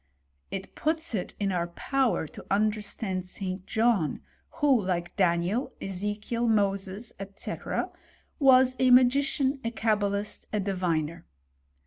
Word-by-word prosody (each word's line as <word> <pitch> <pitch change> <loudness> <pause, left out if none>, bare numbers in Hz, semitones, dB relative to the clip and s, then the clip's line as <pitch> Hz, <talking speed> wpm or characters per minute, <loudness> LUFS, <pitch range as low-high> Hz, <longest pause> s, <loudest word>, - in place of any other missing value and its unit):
It 195 0 -6
puts 320 -1 -1
it 190 -5 -3
in 200 -1 0
our 175 -2 0
power 255 - 0
to - - -11
understand 210 -2 0
St. 185 0 -5
John, 220 -8 +1 0.3
who, 290 -7 +3
like 175 -2 -2
Daniel, 180 +5 +1
£ze« 200 +2 -3
kiel, 235 +2 -1
Moses, 200 0 0 0.2
&c., - - -5 0.9
was 260 -2 +6
a 255 - +4
magician, 265 +2 +4
a 230 - 0
cabalist, 205 -2 -1
a 210 - 0
diviner. 170 -4 -1
205 Hz, 120 wpm, -28 LUFS, 185-245 Hz, 0.9 s, was